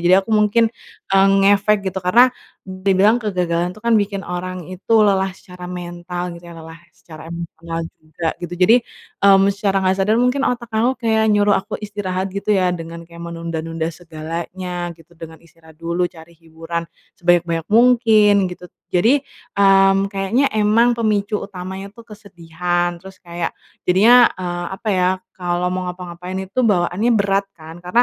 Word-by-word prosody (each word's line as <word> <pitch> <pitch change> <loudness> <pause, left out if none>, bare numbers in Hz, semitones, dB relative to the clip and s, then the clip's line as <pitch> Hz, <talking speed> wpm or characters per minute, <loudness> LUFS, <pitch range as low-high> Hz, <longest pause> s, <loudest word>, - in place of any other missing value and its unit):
Jadi 185 - +7
aku 225 - -9
mungkin, 210 +2 +3 0.5
eee, 195 0 +5 0.2
ngefek 205 +1 +4
gitu. 190 - -3
Karena, 235 +8 +5 0.4
dibilang 190 +3 +2
kegagalan 180 -4 -1
itu 215 - -13
kan 235 - +2
bikin 200 -1 -1
orang 180 +1 -5
itu 185 +5 -5
lelah 195 -1 +1
secara 180 -1 -12
mental 175 0 -6
gitu 170 - -15
ya, - - -10
lelah 160 0 -11 0.2
secara 155 -2 -13
emosional 170 0 -6 0.2
juga 155 +1 -5 0.2
gitu. 175 - -7
Jadi, 220 +6 +6 0.5
mmm, 195 0 +6
secara 195 -1 0
nggak 190 0 +2
sadar, 210 +3 +2
mungkin 250 +3 +1
otak 240 -1 -2
aku 240 +4 +2
kayak 220 -2 +2
nyuruh 205 0 +3
aku 205 +3 -5
istirahat 195 -2 -3
gitu 200 +2 -2
ya 185 -3 +2
dengan 165 0 -9
kayak 170 0 -10
menunda-nunda 165 -1 -4
segalanya 170 +2 -6
gitu, 165 +1 -21
dengan 160 0 -11
istirahat 165 -1 -20
dulu 170 +2 -1
cari 165 0 -15
hiburan 165 +1 -6 0.3
sebanyak-banyak 170 -2 +1
mungkin 225 -3 +5 0.2
gitu. 180 0 -11 0.2
Jadi, 230 +11 +3 0.4
mmm, 195 0 +4
kayaknya 195 +8 0
emang 220 +3 +3
pemicu 210 -2 0
utamanya 190 0 -7
tuh 230 - -13
kesedihan, 175 -4 -3
terus 190 +1 -13
kayak 170 -1 -5 0.3
jadinya, 235 +7 +6
eee, 175 -1 -4
apa 220 - -6
ya, 180 -1 +2 0.3
kalau 175 0 -1
mau 185 0 -3
ngapa-ngapain 180 0 -7
itu 190 +4 -7
bawaannya 195 +3 +1
berat 200 -1 +1
kan? 160 0 -12
Karena 205 +7 +3
185 Hz, 155 wpm, -19 LUFS, 170-205 Hz, 0.5 s, Jadi